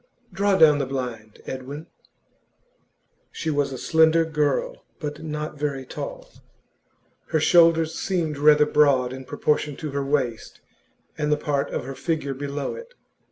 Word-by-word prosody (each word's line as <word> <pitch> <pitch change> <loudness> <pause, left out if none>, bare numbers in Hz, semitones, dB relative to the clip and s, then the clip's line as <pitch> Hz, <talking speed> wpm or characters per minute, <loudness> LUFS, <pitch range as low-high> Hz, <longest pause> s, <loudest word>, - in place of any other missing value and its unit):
'Draw 200 +1 +2
down 150 -4 +6
the 140 - 0
blind, 120 -5 -5
Edwin.' 135 +4 -6 1.5
She 160 - -3
was 145 -2 0
a 130 - -5
slender 160 +3 +3
girl, 150 -3 -1 0.2
but 150 -2 -5
not 150 -1 -5
very 140 -3 -2
tall; - - -7 1.0
her 160 - +1
shoulders 165 0 +4
seemed 160 -5 -2
rather 150 0 +6
broad 140 -4 +3
in 130 0 -8
proportion 150 +2 -1
to 155 0 -6
her 140 0 -2
waist 135 -5 -2 0.6
and 150 0 0
the 150 - +3
part 145 -2 -1
of - - -4
her 135 - -5
figure 140 0 -2
below 140 +1 -4
it. 475 +1 -11
150 Hz, 145 wpm, -24 LUFS, 135-160 Hz, 1.5 s, down